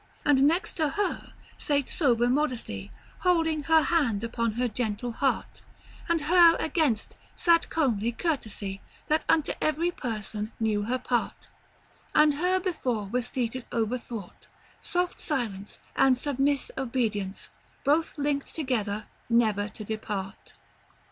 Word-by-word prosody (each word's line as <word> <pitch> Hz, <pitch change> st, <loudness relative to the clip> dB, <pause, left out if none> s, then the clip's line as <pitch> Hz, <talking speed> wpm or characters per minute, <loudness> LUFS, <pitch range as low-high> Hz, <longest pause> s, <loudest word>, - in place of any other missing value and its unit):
"And 280 Hz, -2 st, +5 dB
next 335 Hz, +5 st, 0 dB
to 310 Hz, -3 st, +2 dB
her 400 Hz, +5 st, -2 dB, 0.3 s
sate 285 Hz, -3 st, +1 dB
sober 245 Hz, -8 st, +2 dB
Modestie, 245 Hz, -, -1 dB, 0.3 s
Holding 325 Hz, -4 st, +2 dB
her 320 Hz, 0 st, +5 dB
hand 265 Hz, -10 st, +1 dB
upon 230 Hz, -1 st, -1 dB
her 245 Hz, +2 st, 0 dB
gentle 230 Hz, +1 st, -2 dB
hart; 270 Hz, +3 st, -1 dB, 0.5 s
And 335 Hz, -2 st, +2 dB
her 335 Hz, +2 st, +6 dB
against, 305 Hz, -9 st, 0 dB, 0.2 s
sate 335 Hz, -1 st, +3 dB
comely 235 Hz, -8 st, +1 dB
Curtesie, 220 Hz, -, -3 dB, 0.3 s
That 310 Hz, +1 st, +2 dB
unto 315 Hz, -3 st, +3 dB
every 320 Hz, +3 st, +1 dB
person 215 Hz, -, -4 dB
knew 215 Hz, -2 st, +1 dB
her 250 Hz, +3 st, 0 dB
part; 245 Hz, -1 st, -2 dB, 0.7 s
And 300 Hz, -1 st, +6 dB
her 360 Hz, +5 st, +1 dB
before 250 Hz, -, -2 dB
was 245 Hz, +2 st, -1 dB
seated 245 Hz, 0 st, -3 dB
overthwart 230 Hz, -3 st, -4 dB, 0.3 s
Soft 355 Hz, 0 st, -1 dB
Silence, 215 Hz, -9 st, -3 dB, 0.2 s
and 265 Hz, -1 st, +5 dB
submisse 280 Hz, +1 st, 0 dB
Obedience, 225 Hz, -7 st, -2 dB, 0.3 s
Both 305 Hz, +4 st, +2 dB
linckt 285 Hz, -1 st, -1 dB
together 220 Hz, -8 st, -1 dB, 0.2 s
never 215 Hz, -3 st, +2 dB
to 215 Hz, -, -9 dB
dispart." 210 Hz, -2 st, -5 dB
255 Hz, 125 wpm, -27 LUFS, 220-310 Hz, 0.7 s, her